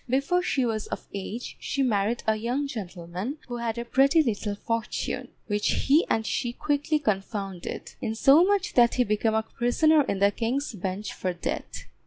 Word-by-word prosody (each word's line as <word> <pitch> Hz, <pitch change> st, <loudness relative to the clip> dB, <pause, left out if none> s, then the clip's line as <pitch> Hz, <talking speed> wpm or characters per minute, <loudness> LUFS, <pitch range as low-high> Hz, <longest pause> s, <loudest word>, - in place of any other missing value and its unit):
Before 275 Hz, +8 st, +2 dB
she 270 Hz, -7 st, 0 dB
was 220 Hz, -2 st, -2 dB
of -, -, -6 dB
age 200 Hz, +4 st, -5 dB
she 275 Hz, -, -1 dB
married 220 Hz, -1 st, +1 dB
a 220 Hz, -, +3 dB
young 245 Hz, +6 st, -1 dB
gentleman 190 Hz, -, -5 dB
who 245 Hz, -1 st, -4 dB
had 235 Hz, -1 st, -2 dB
a 235 Hz, -, -3 dB
pretty 275 Hz, +6 st, +4 dB
little 210 Hz, -4 st, -2 dB
fortune, 230 Hz, +1 st, -3 dB, 0.2 s
which 205 Hz, -1 st, 0 dB, 0.2 s
he 295 Hz, +5 st, +4 dB
and 220 Hz, -, +1 dB
she 240 Hz, +2 st, -1 dB
quickly 295 Hz, +3 st, 0 dB
confounded; 195 Hz, -7 st, -3 dB
insomuch 335 Hz, -, +4 dB
that 240 Hz, -1 st, +5 dB
he 250 Hz, -, +4 dB
became 220 Hz, 0 st, +1 dB
a 220 Hz, -, +2 dB
prisoner 295 Hz, +8 st, +3 dB
in 250 Hz, -8 st, -1 dB
the 200 Hz, +1 st, +4 dB
King's 250 Hz, +6 st, -2 dB
Bench 195 Hz, +1 st, -4 dB
for 185 Hz, -1 st, -2 dB
debt. 175 Hz, -, -5 dB
235 Hz, 170 wpm, -26 LUFS, 205-275 Hz, 0.2 s, that